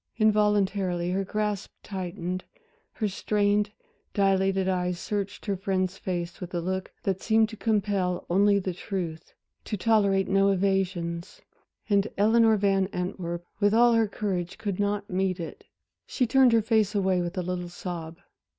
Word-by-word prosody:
Involuntarily 200 -5 +2
her 195 +1 0
grasp 210 0 -2
tightened, 185 -1 -4 0.5
her 215 - -1
strained, 205 +1 +1 0.5
dilated 195 -1 +2
eyes 180 -1 0
searched 200 +1 -4
her 200 -3 0
friend's 190 -1 -1
face 175 -2 -4
with 180 0 -6
a - - +1
look 185 +2 -3
that 190 -1 -1
seemed 220 0 +3
to 220 - -8
compel 200 -5 0
only 200 +3 +4
the 190 -2 -2
truth 170 -3 -5 0.3
to 210 - -3
tolerate 200 -2 +3
no 195 +1 +3
evasions. 185 -3 -1 0.4
And 200 -1 +3
Eleanor 220 +2 +5
Van 195 -1 +2
Antwerp, 180 -3 -4
with 205 0 +3
all 240 +1 +6
her 225 -1 +3
courage, 195 -3 -3
could 205 -4 -3
not 205 0 0
meet 185 0 -1
it. 165 - -7 0.4
She 255 - 0
turned 260 +1 +5
her 225 -1 +4
face 215 -2 +2
away 190 -2 +2
with 175 +2 -4
a 180 - 0
little 180 0 -3
sob. 170 -2 -6
195 Hz, 150 wpm, -27 LUFS, 180-210 Hz, 0.5 s, all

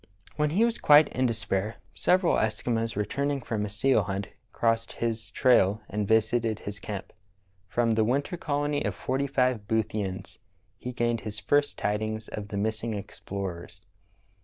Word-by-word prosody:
When 150 0 +1
he 200 +9 +3
was 235 0 -1
quite 150 0 +7
in 130 0 +1
despair, 110 -2 -1 0.2
several 180 -1 +3
Eskimos 115 +1 0
re 105 +1 0
turning 140 +3 -1
from 115 -4 -3
a 105 - -3
seal 110 +4 +3
hunt 95 +1 -3 0.2
crossed 115 -1 0
his 115 -1 -2
trail 110 -5 +3
and 105 0 -2
visited 110 0 +2
his 105 -1 -6
camp. 100 -2 -6 0.5
From 115 +4 +1
the 110 0 +3
winter 140 +9 0
colony 145 -2 -1
of 100 -4 -2
forty 135 +6 -1
five 125 -6 +1
Boothians 105 -4 -2 0.4
he 125 - -5
gained 120 -2 0
his 105 -1 -5
first 145 +7 +1
tidings 110 +1 -2
of 105 -1 -5
the 100 - -4
missing 110 +2 -1
explorers. 95 -3 -6
110 Hz, 160 wpm, -28 LUFS, 105-130 Hz, 0.5 s, quite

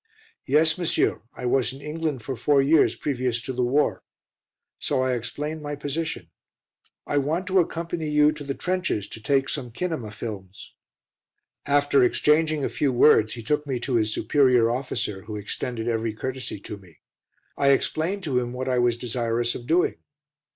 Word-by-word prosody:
"Yes, 155 +4 +4
monsieur, 175 - +1
I 125 - -6
was 125 0 +2
in 135 - -10
England 150 -3 -3
for 135 +3 -4
four 140 +4 +3
years 145 +3 +4
previous 125 -4 -1
to 130 - -4
the 125 - -1
war." 135 +5 +1 0.8
So 130 - 0
I 130 0 +1
explained 150 +6 -3
my 145 0 -4
position. 145 +3 -4 0.7
"I 145 - +1
want 160 +7 -1
to 190 0 +3
accompany 165 -1 -2
you 150 0 +4
to 150 -1 -7
the 140 -1 -4
trenches 180 - -1
to 110 - -8
take 135 +4 +1
some 130 -5 -3
kinema 125 -4 -4
films." 100 -3 -8 0.9
After 145 -1 +4
exchanging 150 +5 +2
a - - -1
few 140 -3 +2
words 115 -4 +5
he 115 - -7
took 150 +5 -1
me 130 -3 -1
to 125 -1 0
his 110 -1 +1
superior 125 -3 +3
officer, 120 -5 -3
who 105 0 -6
extended 110 +3 -4
every 115 -1 -1
courtesy 130 -1 -4
to 105 - -7
me. 90 -5 -19 0.6
I 140 - +1
explained 160 +8 +1
to 135 -7 +1
him 120 0 -4
what 130 +1 -4
I 125 -1 +1
was 120 -1 +2
desirous 120 0 -1
of 120 - -8
doing. 170 +4 +2
130 Hz, 170 wpm, -25 LUFS, 120-150 Hz, 0.9 s, words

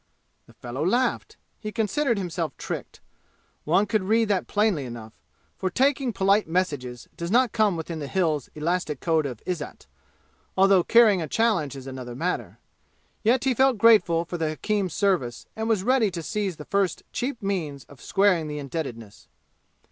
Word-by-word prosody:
The - - -18
fellow 125 +4 -5
laughed. 240 +9 0 0.2
He 215 - -5
considered 230 +3 0
himself 170 -4 -3
tricked; - - -6 0.6
one 180 +7 +3
could 210 0 0
read 220 +3 +2
that 195 -3 0
plainly 205 -8 +1
enough; 115 -3 -8 0.5
for 190 - 0
taking 265 +4 +1
polite 200 +1 +2
messages 145 -9 -2
does 170 0 -5
not 240 +2 +3
come 210 -5 +2
within 160 0 -5
the 145 - -5
Hills' 155 -4 0
elastic 155 -2 -1
code 160 -3 +1
of 125 -5 -8
izzat, 175 -5 -5 0.7
although 190 -1 +5
carrying 220 -4 +5
a 160 - -3
challenge 175 - +1
is 135 -1 -9
another 130 -2 -7
matter. 175 +7 -3 0.7
Yet 240 +3 +3
he 265 -1 +2
felt 260 0 +3
grateful 200 -7 +5
for 175 0 -5
the 160 -1 0
hakim's 190 +3 -1
service 175 - 0
and 220 +1 -3
was 215 -4 +2
ready 245 -2 +3
to 170 -3 -6
seize 200 0 -2
the 150 - -10
first 195 -4 0
cheap 250 0 -2
means 160 -9 -2
of 140 -3 -17
squaring 190 -5 +2
the 150 0 -5
indebtedness. 135 -7 -6
185 Hz, 165 wpm, -25 LUFS, 150-215 Hz, 0.7 s, although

